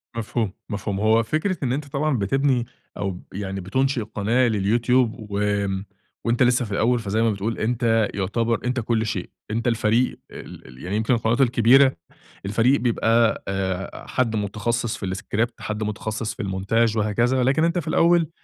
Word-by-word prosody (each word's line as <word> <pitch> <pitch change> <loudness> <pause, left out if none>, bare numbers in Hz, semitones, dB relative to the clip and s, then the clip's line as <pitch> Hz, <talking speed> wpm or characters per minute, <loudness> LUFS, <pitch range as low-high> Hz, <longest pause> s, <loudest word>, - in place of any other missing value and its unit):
مفهوم، 110 -3 -2 0.2
مفهوم. 100 -1 -3
هو 110 +2 +3
فكرة 155 - -1
إن 125 -2 0
أنت 145 +2 -3
طبعًا 140 0 0
بتبني 125 +4 +1 0.3
أو 100 - -2
ب 90 - -10
يعني 95 0 -4
بتُنشئ 130 +6 0
قناة 110 +4 +1
لليوتيوب، 115 +1 +1
وامم، 100 -1 -1 0.4
وأنت 120 +2 +2
لسه 125 0 +3
في 105 - -9
الأول، 120 +4 +2
فزي 110 0 -1
ما 115 -1 +3
بتقول 105 +3 -3
أنت 115 -1 +1
يُعتبر 115 +4 0
أنت 125 +1 0
كل 115 -1 0
شيء، 100 -5 -3 0.2
أنت 115 +2 -1
الفريق 115 +1 +1
ال - - -11
ال 65 0 -13
يعني 90 +3 -3
يمكن 110 +4 +1
القنوات 115 +2 +1
الكبيرة، 130 +2 +5 0.5
الفريق 115 +7 +3
بيبقى، 115 -1 +2
آآ 95 -1 -3
حد 115 -4 0
مُتخصص 110 +3 -2
في - - -5
الscript، 110 +4 -1
حد 110 0 -4
متخصص 110 +1 -3
في - - -6
المونتاج 105 +4 0
وهكذا. 120 +5 +1
لكن 140 +5 +2
أنت 170 +2 +1
في 160 - -7
الأول 170 0 +3
115 Hz, 165 wpm, -23 LUFS, 105-125 Hz, 0.5 s, الكبيرة